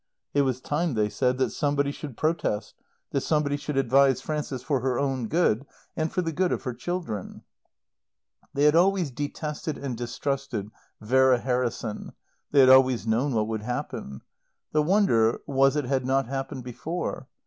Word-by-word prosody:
It 145 - +4
was 130 -2 0
time, 150 0 -1
they 105 -1 +1
said, 125 +3 0
that 130 - +1
somebody 145 -2 0
should 145 -4 -8
protest, 155 -9 -1 0.4
that 140 - 0
somebody 150 0 +1
should 145 0 -4
advise 135 0 +4
Frances 140 -2 -4
for 140 -4 0
her 125 0 0
own 135 -4 -1
good 140 -5 +2 0.3
and 160 -1 -1
for 180 - 0
the 165 - -2
good 180 +3 0
of - - -2
her 125 -3 -3
children. 145 - -5 1.1
They 140 - 0
had 150 0 +6
always 180 -3 +3
detested 150 +2 -4
and 135 -3 -4
distrusted 120 -2 -3 0.3
Vera 130 +3 +4
Harrison; 120 -3 -2 0.4
they 140 - +5
had 130 - +7
always 130 -3 +5
known 120 +5 +1
what 110 -1 +1
would 110 -1 -3
happen. 105 - -5 0.5
The 155 - +3
wonder 150 - +3
was 135 0 +3
it 150 -3 0
had 130 0 0
not 135 +1 +1
happened 135 0 -4
before. 135 +2 -4
135 Hz, 165 wpm, -26 LUFS, 125-150 Hz, 1.1 s, had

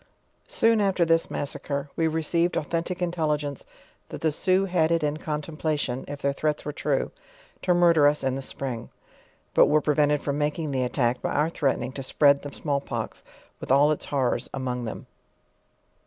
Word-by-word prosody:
Soon 230 - +3
after 190 -3 +2
this 165 0 +2
massacre, 140 0 -3
we 165 - +1
received 165 +2 0
authentic 170 +4 -2
intelli 165 -4 +1
gence, 145 -2 -6 0.5
that - - -7
the 160 - +2
Sioux 185 +5 +2
had 175 -4 +2
it 165 -2 +2
in 150 0 0
contemplation 150 -4 -3
(if 145 0 -7
their 140 0 +2
threats 150 +1 -1
were 150 - -3
true) 145 -3 -1 0.5
to 180 -1 +2
murder 170 -4 +5
us 150 +1 +1
in 130 -1 +1
the 135 - -3
spring; 130 -3 -4 0.6
but - - +6
were 155 - +4
prevented 150 0 +2
from 145 0 -2
making 150 +1 -1
the 130 -1 0
attack, 125 -1 0
by - - -1
our 150 +3 +1
threatening 135 -5 -1
to 135 - -6
spread 140 +1 +4
the 145 - -7
small 140 -2 -1
pox - - -5 0.4
with - - -5
all 145 +3 +5
its 155 - -2
horrors 135 -4 -1
among 125 -2 -3
them. 110 - -6
150 Hz, 180 wpm, -26 LUFS, 140-165 Hz, 0.6 s, but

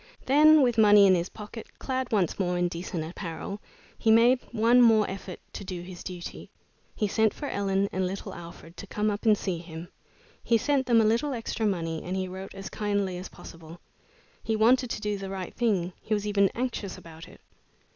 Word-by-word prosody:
Then, 305 +2 +6
with 240 -3 +2
money 205 -1 +7
in 190 - +6
his 175 0 0
pocket, 215 +1 -10
clad 260 -1 -3
once 200 -5 0
more 180 -2 0
in 175 0 +1
decent 170 -1 -4
apparel, 170 +4 -6 0.4
he 225 - +1
made 235 +3 +6
one 235 +2 +4
more 220 -3 +5
effort 190 -1 -7
to - - -6
do 180 -2 -6
his 180 -1 -10
duty. 180 -2 -8 0.5
He 210 - 0
sent 220 +1 +1
for 295 - -6
Ellen 195 -2 0
and 185 0 -1
little 195 +2 -6
Alfred 170 0 -11
to 200 - -8
come 210 +2 -1
up 205 +2 -4
and 215 -1 +6
see 180 -4 -3
him. 165 0 -9 0.5
He 230 - +3
sent 275 +3 0
them 230 -2 +5
a - - +2
little 235 +6 +1
extra 225 -2 -2
money, 165 -5 -2
and 180 - -4
he 185 0 -2
wrote 190 +2 -8
as 195 0 -7
kindly 200 -3 -2
as 185 - -8
possible. 165 0 -12 0.6
He 225 - -1
wanted 240 +3 +3
to - - -4
do 210 -2 -2
the 195 0 -6
right 190 -2 -6
thing; 195 -7 0
he 215 - -1
was 205 0 -3
even 200 -2 +3
anxious 235 -5 -3
about 165 0 -12
it. - - -16
200 Hz, 205 wpm, -27 LUFS, 180-225 Hz, 0.6 s, money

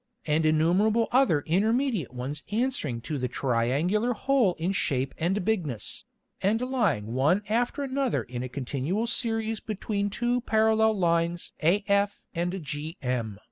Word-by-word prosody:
and 155 +1 +2
innumerable 185 +9 +3
other 245 - +4
intermediate 215 - +1
ones 130 +4 -5
answering 210 - -1
to 150 +3 -4
the 125 - -1
triangular 140 - +1
Hole 240 -5 +2
in 170 +4 -1
Shape 135 -8 -1
and 180 +3 0
Bigness, 160 - -2 0.4
and 210 +4 +2
lying 225 - 0
one 150 +11 +2
after 240 +6 0
another 270 -2 0
in 120 0 -6
a 130 - -4
continual 140 - -2
Series 225 -2 -1
between 205 -1 -2
two 240 +4 0
Parallel 220 -1 +3
Lines 170 -1 0
af 200 +4 +2
and 175 0 -1
gm. 145 - -4
185 Hz, 135 wpm, -27 LUFS, 145-220 Hz, 0.4 s, other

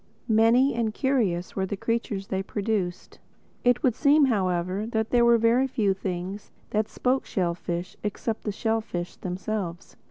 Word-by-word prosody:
Many 235 +4 +4
and 230 -2 -1
curious 215 -11 0
were 190 -1 -1
the 200 - -4
creatures 225 -2 -2
they 190 0 -1
produced. 195 -3 -3 0.4
It 245 0 +3
would 250 - +4
seem 290 +3 +5
however 185 -3 0
that 220 -1 -1
there 240 -1 +4
were 235 0 +6
very 230 +4 +3
few 210 -6 +1
things 190 +1 -5 0.2
that 215 0 +1
spoke 260 +1 0
shellfish 175 -1 -3
except 210 +2 -3
the 210 - -1
shellfish 220 -5 -2
themselves. 180 -1 -4
215 Hz, 150 wpm, -26 LUFS, 185-235 Hz, 0.4 s, were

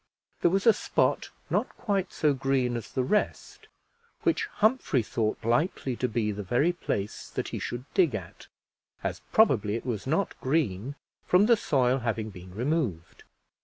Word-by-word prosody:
There - - +5
was 195 +3 0
a 230 - +8
spot - - 0 0.2
not - - +1
quite 195 -4 -1
so 150 -2 +2
green 135 -2 0
as 115 -3 -6
the 130 - 0
rest, 210 +11 -1 0.6
which 440 - +1
Humphrey 215 - +1
thought 110 0 -2
likely 130 +1 +1
to 125 - 0
be 110 -2 -1
the 105 0 -5
very 125 - +2
place 105 - -4
that - - -3
he - - -4
should 120 +1 -5
dig 170 - +3
at, 95 -5 -8 0.6
as - - -3
probably 110 - +4
it 115 - -5
was 120 -2 -3
not 165 +7 +1
green 130 - 0 0.3
from 185 +3 +5
the 235 +1 +6
soil 130 - +2
having 115 -2 -2
been 90 -1 -11
removed. 120 - -2
130 Hz, 165 wpm, -28 LUFS, 110-170 Hz, 0.6 s, a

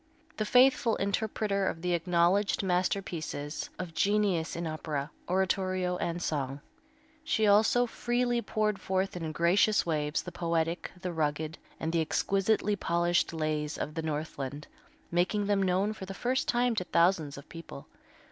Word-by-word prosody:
The 215 - 0
faithful 250 -2 +5
interpreter 200 -1 0
of 165 - -3
the 180 0 +1
acknowledged 175 +4 +2
masterpieces 180 -5 -2
of 180 -3 -6
genius 200 -4 +1
in 170 +1 -3
opera, 155 -2 -3 0.2
oratorio 185 -1 0
and 170 0 -2
song, 140 -4 -2 0.6
she 220 -7 +1
also 220 +4 +5
freely 240 0 0
poured 210 -2 -1
forth 190 0 -1
in 165 -3 -3
gracious 180 +6 +3
waves 150 -2 -1
the - - -7
poetic, 165 0 -1
the 180 -1 -4
rugged, 155 0 -2 0.2
and 160 +1 -2
the 165 - +3
exquisitely 200 +5 +1
polished 175 -2 +1
lays 155 -2 -2
of 150 - -4
the 165 - -3
Northland, 150 -2 -4 0.5
making 180 +4 +1
them 200 -1 +2
known 190 +3 +1
for 190 -3 -8
the 195 - -6
first 255 +5 0
time 240 0 +2
to 180 - +1
thousands 170 -5 +2
of 140 - -11
people. 165 -4 -10
180 Hz, 145 wpm, -30 LUFS, 160-205 Hz, 0.6 s, faithful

